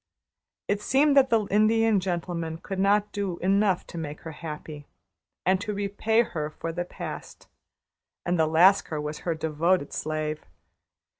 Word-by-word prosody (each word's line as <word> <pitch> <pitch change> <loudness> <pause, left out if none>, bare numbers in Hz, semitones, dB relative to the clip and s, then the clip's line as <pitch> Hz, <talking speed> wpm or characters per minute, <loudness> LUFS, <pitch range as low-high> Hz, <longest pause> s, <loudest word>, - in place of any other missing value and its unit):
It 200 +1 0
seemed 280 +6 +3
that 270 -2 +6
the 225 -3 +2
Indian 215 0 +4
Gentleman 170 -3 -3
could 190 +3 -6
not 205 +1 +2
do 195 -4 -3
enough 195 0 +2
to 170 - -7
make 150 -2 -6
her 165 - -7
happy, 150 -2 -8 0.6
and 185 +1 +3
to 210 0 -3
repay 205 +3 +1
her 155 -8 -4
for 165 +1 -5
the 175 +1 -3
past; - - -8 0.8
and 175 -1 0
the 160 - +4
Lascar 165 0 +4
was 150 +1 -4
her 170 -2 -2
devoted 160 +1 0
slave. 155 0 -3
180 Hz, 150 wpm, -26 LUFS, 160-205 Hz, 0.8 s, that